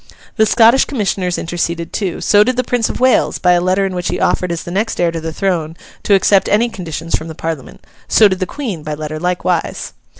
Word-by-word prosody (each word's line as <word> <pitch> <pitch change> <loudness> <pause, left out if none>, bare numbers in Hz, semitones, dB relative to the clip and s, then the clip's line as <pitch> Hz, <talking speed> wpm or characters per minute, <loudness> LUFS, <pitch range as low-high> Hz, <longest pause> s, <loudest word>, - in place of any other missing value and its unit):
The 220 -2 +3
Scottish 230 +4 +5
Commissioners 195 -8 -2
interceded 170 0 -3
too; 190 -5 -3
so 205 -1 +5
did 255 +2 -1
the 255 - +1
Prince 240 -2 0
of - - -5
Wales, 255 0 +2
by 180 - +2
a 175 0 +3
letter 185 +2 +1
in 190 - -3
which 180 -1 -3
he - - -2
offered 180 -1 0
as 170 -1 -4
the 175 - -7
next 215 +5 -2
heir 175 -1 +2
to 165 -1 -5
the 160 0 -4
throne, 165 -2 -2 0.2
to 200 - +3
accept 195 0 +3
any 230 +3 +2
conditions 170 -5 -4
from 160 - -5
the 160 - -8
Parliament; 160 -4 -6 0.2
so 215 - +6
did 185 -2 -2
the 185 - -2
Queen, 220 - -5
by 150 0 -5
letter 155 0 -5
likewise. 180 0 -2
180 Hz, 230 wpm, -16 LUFS, 165-210 Hz, 0.2 s, so